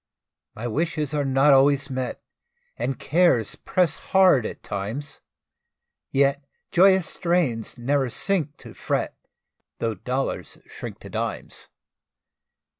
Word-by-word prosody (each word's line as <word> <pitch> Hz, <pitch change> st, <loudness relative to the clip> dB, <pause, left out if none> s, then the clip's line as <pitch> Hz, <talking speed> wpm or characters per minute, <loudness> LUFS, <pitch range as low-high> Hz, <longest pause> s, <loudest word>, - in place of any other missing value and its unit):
My 115 Hz, -, -6 dB
wishes 155 Hz, +3 st, -1 dB
are 145 Hz, -1 st, +1 dB
not 135 Hz, +1 st, +4 dB
always 140 Hz, +1 st, +4 dB
met, 130 Hz, -1 st, -4 dB, 0.5 s
And 125 Hz, +3 st, -2 dB
cares 155 Hz, -, +2 dB
press 175 Hz, -5 st, 0 dB
hard 185 Hz, -, +4 dB
at -, -, -9 dB
times; 110 Hz, +9 st, -5 dB, 0.9 s
Yet 140 Hz, +1 st, +2 dB, 0.3 s
joyous 190 Hz, 0 st, +5 dB
strains 165 Hz, -, -1 dB
ne'er 135 Hz, +2 st, 0 dB
sink 155 Hz, -, -1 dB
to -, -, -10 dB
fret, -, -, -2 dB, 0.6 s
Tho' 115 Hz, -1 st, -1 dB
dollars 125 Hz, +7 st, -3 dB
shrink -, -, -8 dB
to -, -, -10 dB
dimes. -, -, -5 dB
140 Hz, 115 wpm, -24 LUFS, 125-165 Hz, 0.9 s, joyous